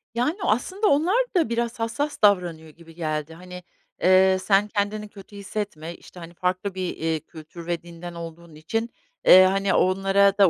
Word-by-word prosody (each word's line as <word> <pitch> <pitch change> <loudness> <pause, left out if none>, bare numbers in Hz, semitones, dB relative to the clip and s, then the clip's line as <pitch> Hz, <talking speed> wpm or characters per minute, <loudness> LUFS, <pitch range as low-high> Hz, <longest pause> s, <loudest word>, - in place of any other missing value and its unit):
Yani 255 +9 0
aslında 375 - 0
onlar 365 - +3
da 335 -10 +2
biraz 235 0 -2
hassas 235 +7 -3
davranıyor 175 -6 +2
gibi 165 +1 -17
geldi. 155 -1 -3
Hani, 180 +1 -11 0.4
eee, 190 +1 +5
sen 200 0 +3
kendini 210 0 -2
kötü 200 0 -14
hissetme, 195 -5 -5
işte, 180 - -15
hani 170 0 -10
farklı 185 +3 -2
bir, 185 - -3
iii, 160 -1 -1
kültür 165 +1 -11
ve 175 -1 -2
dinden 170 0 -9
olduğun 170 -1 -10
için, 225 +10 -3 0.4
eee, 185 +1 +9
hani 195 +1 +1
onlara 195 +1 +3
da 200 -3 +6
190 Hz, 165 wpm, -24 LUFS, 170-210 Hz, 0.4 s, eee